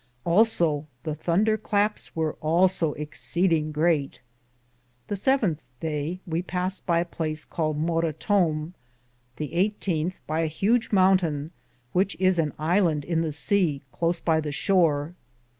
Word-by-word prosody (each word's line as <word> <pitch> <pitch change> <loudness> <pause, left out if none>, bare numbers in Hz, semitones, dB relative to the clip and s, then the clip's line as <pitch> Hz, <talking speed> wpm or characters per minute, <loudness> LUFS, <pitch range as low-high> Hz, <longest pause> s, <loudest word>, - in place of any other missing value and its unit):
Also 170 -6 +2 0.2
the 155 - -2
Thunder 190 +8 +1
clapes 210 0 -1
weare 160 -2 0
also 165 0 +2
exseding 155 +1 0
greate. 150 -2 0 0.9
The 205 - -1
seventhe 195 - +1
daye 160 +3 -3
we 170 0 -1
passed 185 +1 -3
by 170 -1 +3
a - - -2
place 155 -2 -4
caled 155 -2 -2
Morrottome. 165 +1 0 0.6
The 150 -2 -4
1 175 +2 +4
8th, 170 -1 -1
by 155 +1 -2
a 165 - +1
hudge 220 +9 +1
mountaine, 185 -6 +2 0.4
which 195 +2 +1
is 185 -2 +3
an 155 -2 +1
Ilande 160 -2 +1
in 165 -1 0
the 165 - -1
seae, 155 -1 +2
close 170 +6 -1
by 160 -1 +1
the 150 -1 -4
shore. 160 -2 +1
165 Hz, 140 wpm, -25 LUFS, 155-185 Hz, 0.9 s, 1